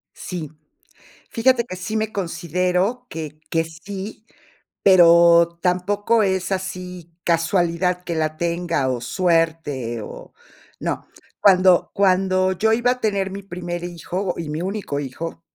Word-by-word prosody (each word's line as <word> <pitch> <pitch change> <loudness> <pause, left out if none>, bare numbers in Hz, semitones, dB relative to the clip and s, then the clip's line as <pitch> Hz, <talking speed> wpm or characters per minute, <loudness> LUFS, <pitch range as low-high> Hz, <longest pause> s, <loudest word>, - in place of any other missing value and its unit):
Sí, 170 -5 -6 0.8
fíjate 235 0 +2
que 185 - -7
sí 190 +4 -4
me 220 0 -1
considero 180 +5 -1
que 155 -1 -7
que 165 0 +1
sí, 195 +6 -8 0.6
pero 170 -2 +6
tampoco 205 +5 +1
es 190 -1 0
así 180 -2 -5
casualidad 175 +1 +1
que 175 - -3
la 155 -1 -1
tenga, 170 -4 -1
o 125 - -2
suerte, 160 -6 0
o - - -10 0.5
no. - - -3 0.3
Cuando 185 -2 +5
cuando 185 -1 +2
yo 220 +4 +1
iba 240 +2 +3
a 250 - -6
tener 200 -4 0
mi 195 +1 -7
primer 175 -2 -5
hijo 180 +2 -3
y 165 -2 -4
mi 155 +3 -3
único 190 -6 -3
hijo 155 +5 -6
180 Hz, 130 wpm, -21 LUFS, 165-195 Hz, 0.8 s, pero